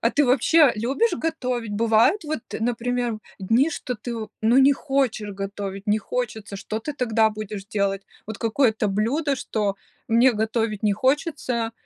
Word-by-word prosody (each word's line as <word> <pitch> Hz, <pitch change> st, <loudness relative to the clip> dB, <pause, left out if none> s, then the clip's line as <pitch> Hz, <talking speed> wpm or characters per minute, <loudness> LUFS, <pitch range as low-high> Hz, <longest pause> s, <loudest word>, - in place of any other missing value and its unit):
А 230 Hz, -, +2 dB
ты 290 Hz, +4 st, +3 dB
вообще 275 Hz, +4 st, +5 dB
любишь 270 Hz, -, +1 dB
готовить? 255 Hz, -10 st, -3 dB
Бывает, 230 Hz, -, +3 dB
вот, 305 Hz, -4 st, -3 dB, 0.2 s
например, 240 Hz, 0 st, -1 dB, 0.2 s
дни, 230 Hz, -, +3 dB
что 250 Hz, -5 st, -4 dB
ты, 235 Hz, +3 st, -6 dB
в 220 Hz, -1 st, -6 dB
ну, 225 Hz, +3 st, +3 dB
не 270 Hz, +1 st, +6 dB
хочешь 270 Hz, -7 st, -1 dB
готовить, 195 Hz, 0 st, -6 dB
не 210 Hz, +1 st, +3 dB
хочется, 220 Hz, -, -4 dB
что 215 Hz, +2 st, -4 dB
ты 265 Hz, +7 st, -5 dB
тогда 225 Hz, -5 st, +2 dB
будешь 210 Hz, -2 st, -6 dB
делать? 200 Hz, -1 st, -1 dB, 0.2 s
Вот 220 Hz, -1 st, -6 dB
какое-то 225 Hz, -1 st, +1 dB
блюдо, 255 Hz, +9 st, 0 dB
что 210 Hz, -5 st, -2 dB, 0.3 s
мне 240 Hz, +3 st, +4 dB
готовить 220 Hz, -1 st, -1 dB
не 210 Hz, -, +4 dB
хочется, 255 Hz, -1 st, 0 dB
230 Hz, 155 wpm, -23 LUFS, 215-265 Hz, 0.3 s, не